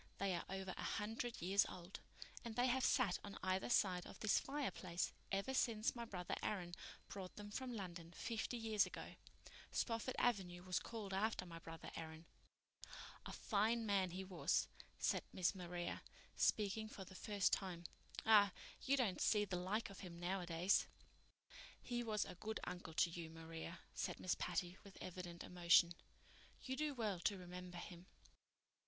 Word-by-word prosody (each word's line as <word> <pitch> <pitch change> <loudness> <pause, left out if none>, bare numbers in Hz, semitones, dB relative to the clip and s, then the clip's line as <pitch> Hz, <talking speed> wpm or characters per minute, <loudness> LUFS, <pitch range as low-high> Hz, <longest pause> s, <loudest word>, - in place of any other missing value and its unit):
"They 195 -1 +1
are 170 - -1
over 190 -1 -3
a - - -5
hundred 225 0 -2
years 195 +3 +5
old, 180 +2 -7 0.4
and 230 -2 -5
they 245 - +4
have 260 +1 +3
sat 235 -9 +4
on 200 -1 -6
either 185 +3 +1
side 185 -6 +3
of - - -10
this 215 - +4
fireplace 255 -11 -1 0.2
ever 200 +7 +1
since 230 -3 +2
my 235 -1 -3
brother 180 -5 -3
Aaron 180 -5 -1 0.3
brought 190 -2 -6
them 205 0 -7
from 260 +3 -2
London 175 -4 -5
fifty 230 +4 -2
years 220 -3 +3
ago. - - -6 0.6
Spofford 230 +1 0
Avenue 180 -7 +2
was 180 -1 +1
called 215 -4 -5
after 200 -1 +1
my 165 -1 -7
brother 165 0 -8
Aaron." 160 0 -6 1.0
"A - - -5
fine 225 +2 +2
man 195 -3 +3
he 185 +2 -4
was," 185 -1 +2 0.3
said - - +2
Miss 180 0 +2
Maria, 175 -2 -3 0.3
speaking 215 +1 +2
for 195 -3 -7
the 185 - -11
first 200 0 +1
time. 180 -3 0 0.4
"Ah, 205 -3 +8 0.3
you 275 +1 +3
don't 220 -8 +2
see 210 -1 +4
the 185 - -2
like 200 +4 0
of 195 - -10
him 170 -2 -7
nowadays." 175 0 +2 0.9
"He 240 -1 -2
was 215 -3 +1
a - - -6
good 215 +5 -3
uncle 175 -3 -5
to 170 - +4
you, 165 -1 -5
Maria," 165 +1 -6
said - - -2
Miss 185 - +2
Patty, 175 +1 -1
with 200 -2 -12
evident 175 -1 -5
emotion. 175 -1 +6 0.7
"You 260 - -3
do 295 0 0
well 210 -7 0
to 200 +3 +1
remember 180 0 -7
him." 175 0 -8
190 Hz, 165 wpm, -42 LUFS, 175-220 Hz, 1.0 s, Ah